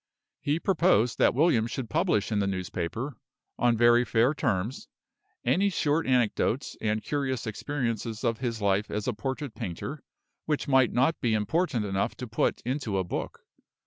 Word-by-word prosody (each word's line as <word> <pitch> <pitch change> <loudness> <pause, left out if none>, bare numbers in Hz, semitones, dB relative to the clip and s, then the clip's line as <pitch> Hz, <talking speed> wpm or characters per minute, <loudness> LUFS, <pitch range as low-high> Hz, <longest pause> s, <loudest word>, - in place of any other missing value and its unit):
He 145 +3 0
proposed 125 - +2
that - - +4
William 130 -7 +3
should 120 0 -4
publish 105 +1 +1
in 105 - +1
the 100 - +1
newspaper, 100 - -3 0.4
on 120 -1 +3
very 120 +1 +5
fair 120 +4 +2
terms, 115 -5 -2 0.6
any 180 +12 +3
short 160 -3 0
anecdotes 125 0 +1
and 110 0 0
curious 135 -4 -2
experiences 115 -1 -3
of 115 -2 0
his 115 -5 -3
life 100 +1 +1
as 105 -1 -3
a 125 - +1
portrait 135 +3 -4
painter, 115 - -5 0.4
which 150 -1 -1
might 130 -3 +4
not 135 +7 +1
be 115 -3 +2
important 120 - 0
enough 95 -1 -1
to 125 - -6
put 115 - 0
into 125 -5 -2
a 95 - +1
book. 90 - -5
120 Hz, 160 wpm, -28 LUFS, 105-135 Hz, 0.6 s, very